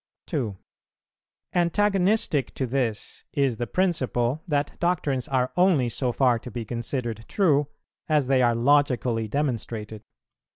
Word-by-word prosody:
2. 120 - -3 1.0
Antagonistic 190 -3 +1
to 130 - -1
this 120 -4 -3
is 135 -5 +1
the 120 - -3
principle 145 -7 0
that 145 -2 -1
doctrines 150 -7 0
are 130 -1 0
only 175 -8 +3
so 125 +2 -1
far 125 -2 +2
to 125 - -9
be 120 0 -5
considered 115 0 -4
true 150 -8 +2 0.4
as 150 -3 +3
they 130 0 +3
are 120 -1 +3
logically 125 -3 +2
demonstrated. 115 -5 -3
130 Hz, 125 wpm, -25 LUFS, 120-150 Hz, 1.0 s, only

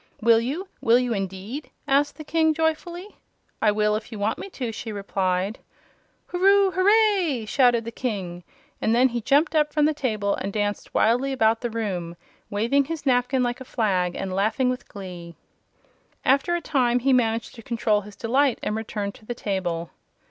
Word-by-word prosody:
"Will 230 0 +5
you? 300 +11 -3
Will 235 -3 +5
you, 250 -1 0
indeed?" 200 +8 -5 0.2
asked 290 +1 +2
the 310 - -7
King, 320 0 +2
joyfully. 340 +4 -2 0.4
"I 215 - +4
will 210 0 +1
if 215 - -6
you 220 - -6
want 205 +2 -1
me - - -7
to," 250 -10 -4
she 225 +1 -6
replied. 195 0 -1 0.7
"Hurroo 390 +2 +4
huray!" 375 - +3
shouted 240 -1 +3
the 230 - -5
King; 190 -8 -4 0.4
and 225 - +2
then 255 +2 +5
he 235 0 -3
jumped 285 +9 +3
up 300 -1 +2
from 300 0 +2
the 310 - +2
table 215 -8 -1
and 195 - -3
danced 205 0 -3
wildly 250 +5 +3
about 225 -3 +2
the 240 - -2
room, 190 -7 -3 0.3
waving 235 +7 +1
his 320 0 -5
napkin 250 0 +2
like 245 +1 -2
a - - -4
flag 190 -8 0
and 190 -1 -4
laughing 220 +6 +1
with 250 - -6
glee. 180 -4 -9 0.9
After 280 +6 +3
a 345 - -2
time 250 -6 +2
he 260 +2 +2
managed 230 -2 +1
to 230 - -11
control 220 -2 0
his 205 0 -12
delight 260 +3 +1
and 210 - -1
returned 210 -2 -4
to 215 - -18
the 240 - -3
table. 175 -6 -3
235 Hz, 180 wpm, -24 LUFS, 205-280 Hz, 0.9 s, Will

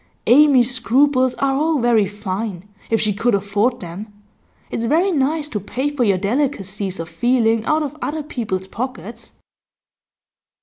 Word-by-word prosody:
Amy's 260 -2 +5
scruples 255 +1 +2
are 270 +3 0
all 310 +3 +1
very 235 -5 +3
fine, 205 -1 -5 0.2
if 225 - +2
she 215 -1 +1
could 225 +2 +1
afford 205 +5 0
them; 185 +5 -8 0.6
it's 230 - -2
very 335 +10 +2
nice 295 0 0
to 220 -8 -4
pay 260 +8 -3
for 285 -4 0
your 200 -4 +2
delicacies 200 - -2
of 165 - -4
feeling 225 +4 +1
out 310 0 +1
of 295 0 -5
other 310 +1 -3
people's 215 -10 -4
pockets. 225 0 -7
235 Hz, 145 wpm, -20 LUFS, 205-275 Hz, 0.6 s, Amy's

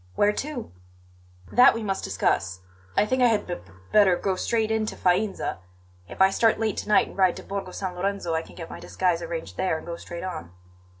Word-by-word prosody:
"Where 205 0 +3
to?" 275 0 -5 0.8
"That 245 -1 +7
we 230 - -3
must 195 -2 -2
discuss. 95 0 0 0.4
I - - +5
think 255 +4 0
I 250 - +7
had 220 -3 +1
b 175 - -3
b 95 - -10 0.2
better 200 -4 +6
go 190 +1 -1
straight 220 +3 0
in 220 -1 +1
to - - -4
Faenza. 185 - 0 0.5
If 190 - +1
I 190 - +5
start 225 +2 +3
late 220 -3 0
to - - -4
night 210 - +4
and - - -12
ride 185 -2 +3
to - - -9
Borgo 195 -1 -4
San 185 0 -4
Lorenzo 185 -1 -2
I 160 - +1
can - - -14
get 165 -2 -7
my - - -7
disguise 180 -2 0
arranged 165 - -5
there 180 -4 +1
and - - -10
go 170 0 -5
straight 170 +1 -8
on." 160 - -6
190 Hz, 225 wpm, -25 LUFS, 170-215 Hz, 0.8 s, That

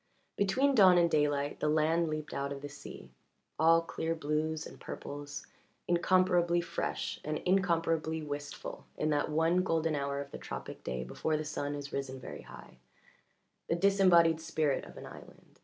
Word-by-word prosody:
Between 255 +8 +2
dawn 190 -7 +7
and 170 -1 +4
daylight 145 -1 +1
the 150 - +1
land 160 +2 +2
leaped 155 -1 -4
out 140 0 -2
of 140 0 -6
the 145 - -5
sea, 140 - -11 0.5
all 165 +1 +5
clear 165 0 -2
blues 155 0 -1
and - - -11
purples, 145 0 -7 0.4
incomparably 175 0 +3
fresh 170 0 -3
and 155 0 -2
incomparably 165 -4 +1
111 - - -8
wistful 145 0 -6
in 155 - 0
that 145 +1 +1
one 165 +3 +2
golden 165 -3 +1
hour 140 -1 -1
of 140 0 -6
the - - -7
tropic - - -7
day 65 0 -3
before 155 - -1
the 155 - -4
sun 145 -1 -3
has 145 -1 -7
risen 135 -1 -3
very - - -8
high 65 - -13 0.9
the 165 - +2
disembodied 175 -4 +5
spirit 155 -3 0
of - - -13
an - - -8
island. - - -14
160 Hz, 170 wpm, -32 LUFS, 145-170 Hz, 0.9 s, dawn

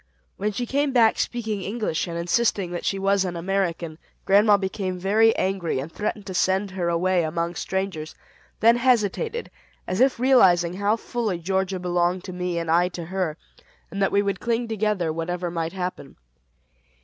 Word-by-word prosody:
When 210 +2 -1
she 245 +4 -3
came 280 +3 0
back 230 -3 +4
speaking 220 -4 -2
English, 200 -5 -2
and 170 -1 -4
insisting 180 +1 +1
that 175 - -5
she 195 - 0
was 195 0 +2
an 180 -2 -3
American, 170 -3 -2 0.3
grandma 205 +1 +5
became 190 -1 -3
very 215 +5 +3
angry, 190 -5 -1
and 140 +5 -4
threatened 210 +1 -3
to 190 - -6
send 190 +2 +1
her 180 -2 -2
away 180 +1 +2
among 170 +2 -2
strangers; 190 -6 -3 0.5
then 230 +2 +6
hesitated, 255 - 0 0.3
as 185 - -2
if 260 -2 +3
realizing 185 -10 +4
how 200 +3 +1
fully 225 -4 -3
Georgia 190 +2 -1
belonged 175 0 0
to 185 - -7
me 180 -1 -2
and 165 -1 -1
I 175 +2 +4
to 175 -2 -7
her, 175 -3 -2 0.5
and 200 - -4
that 195 - +2
we 200 0 +3
would 200 -2 -2
cling 235 0 -1
together 210 -7 0
whatever 175 +2 -3
might 165 0 -3
happen. 180 -6 -5
190 Hz, 175 wpm, -24 LUFS, 175-210 Hz, 0.5 s, then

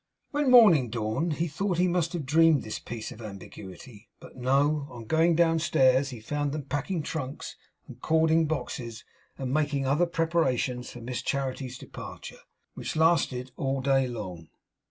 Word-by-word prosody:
When 290 -2 +1
morning 195 - +7
dawned 115 +9 -1
he 165 +3 -1
thought 180 +4 -2
he 180 +1 +3
must 175 -1 0
have 165 -5 -3
dreamed 160 +1 +4
this 110 - -5
piece 115 -2 -7
of 115 - -11
ambiguity; 105 +2 -10
but - - -14
no, 140 +3 +1
on 120 -2 -9
going 160 +7 +3
downstairs 155 -5 +3
he 125 -4 -8
found 145 +5 -2
them 150 -1 -3
packing 145 +5 -2
trunks 140 -3 -5 0.3
and 125 0 -12
cording 160 0 +3
boxes, 125 -7 -4 0.3
and 130 -1 -3
making 145 -2 0
other 150 +6 +2
preparations 160 -7 0
for 120 - -10
Miss 125 +1 -4
Charity's 130 -2 -3
departure, - - -9 0.3
which - - -5
lasted 145 -6 +2
all 135 0 -1
day 135 0 +2
long. 95 -9 -7
140 Hz, 155 wpm, -27 LUFS, 125-160 Hz, 0.3 s, morning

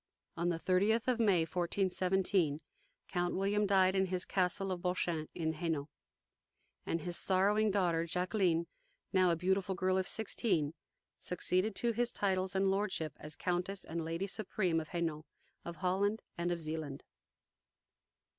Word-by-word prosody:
On 170 +1 0
the 170 - 0
thirtieth 200 +7 +2
of 250 -2 +2
May, 200 -7 +4
1417, 180 -1 +1 0.5
Count 175 -1 -1
William 205 +2 +1
died 190 -1 +4
in 190 0 +2
his 185 0 -2
castle 190 +1 0
of 180 -1 -3
Bouchain, 175 -3 -1
in 160 -2 -1
Hainault, 160 -3 -2 1.0
and 165 - -1
his 175 +2 -3
sorrowing 205 +4 +3
daughter 175 -5 +1
Jacqueline, 180 -1 +1 0.5
now 185 -1 +5
a 170 - +3
beautiful 190 +2 0
girl 185 0 +1
of 190 - -1
sixteen, 185 -8 0 0.5
succeeded 185 +3 0
to 235 - +1
his 240 +1 0
titles 190 -1 0
and 190 0 +3
lordship 190 -6 -1
as 150 0 -5
Countess 180 +2 -2
and 165 +1 -3
Lady 165 +4 -2
Supreme 190 -4 0
of 155 - -6
Hainault, 165 -3 -2 0.4
of 170 - -6
Holland, 195 +6 0
and 170 +1 -1
of 175 - -1
Zealand. 155 -3 -4
185 Hz, 145 wpm, -34 LUFS, 170-195 Hz, 1.0 s, now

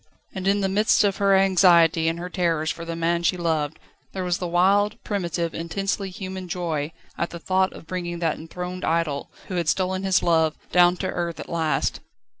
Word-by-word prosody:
And 190 -1 -4
in 200 +1 +3
the 195 - +1
midst 210 +3 +3
of 200 -2 +1
her 200 -1 +4
anxiety 175 -4 +5
and 165 +1 0
her 175 +1 -5
terrors 165 -4 0
for 170 - -7
the 165 0 -4
man 170 +1 0
she 180 +1 +1
loved, 160 -3 -1 0.4
there 190 - -3
was 180 -1 -1
the 180 - -3
wild, 200 +5 +3
primitive, 170 -4 -2
intensely 195 +4 -2
human 190 -1 -6
joy 165 -4 -2 0.3
at 170 - -1
the 170 - -7
thought 185 +2 +1
of - - -12
bringing 175 0 -4
that 165 -2 -1
enthroned 180 +3 -6
idol, 160 -4 -1 0.2
who 185 - -3
had 170 -3 0
stolen 185 0 0
his 190 -1 +2
love, 160 -2 +3 0.2
down 175 0 +5
to - - -2
earth 170 -1 -3
at - - -8
last. 165 -2 0
175 Hz, 200 wpm, -24 LUFS, 165-190 Hz, 0.4 s, anxiety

